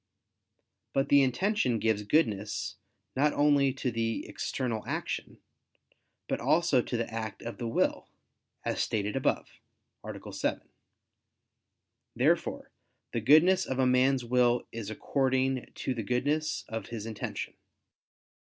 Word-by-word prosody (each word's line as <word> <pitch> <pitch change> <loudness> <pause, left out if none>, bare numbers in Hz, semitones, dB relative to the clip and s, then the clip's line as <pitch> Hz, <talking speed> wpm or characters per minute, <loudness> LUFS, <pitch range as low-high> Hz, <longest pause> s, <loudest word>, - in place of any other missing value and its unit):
But 135 0 +1
the 140 0 +7
intention 130 - +1
gives 110 -1 +1
goodness 105 -4 0 0.4
not 145 +3 +3
only 145 -2 +4
to 130 -2 -2
the 115 0 -1
external 115 -5 -3
action, - - -3 0.9
but - - -1
also 160 -5 +3
to 120 - -3
the 115 - -1
act 110 -2 -5
of 120 - -6
the 120 - -2
will, 115 - 0 0.6
as - - 0
stated 105 -1 -1
above - - -1 0.4
(A. - - -8
7). - - -2 1.5
Therefore - - +1 0.4
the 115 - -1
goodness 165 - +5
of 130 - -2
a 130 - +3
man's 125 0 +3
will 120 0 +3
is 115 -3 -5
according 130 +2 0
to 130 - -2
the 120 - -3
goodness 145 +8 0
of 110 0 -5
his 115 -3 -6
intention. 110 -2 -5
125 Hz, 125 wpm, -30 LUFS, 115-135 Hz, 1.5 s, the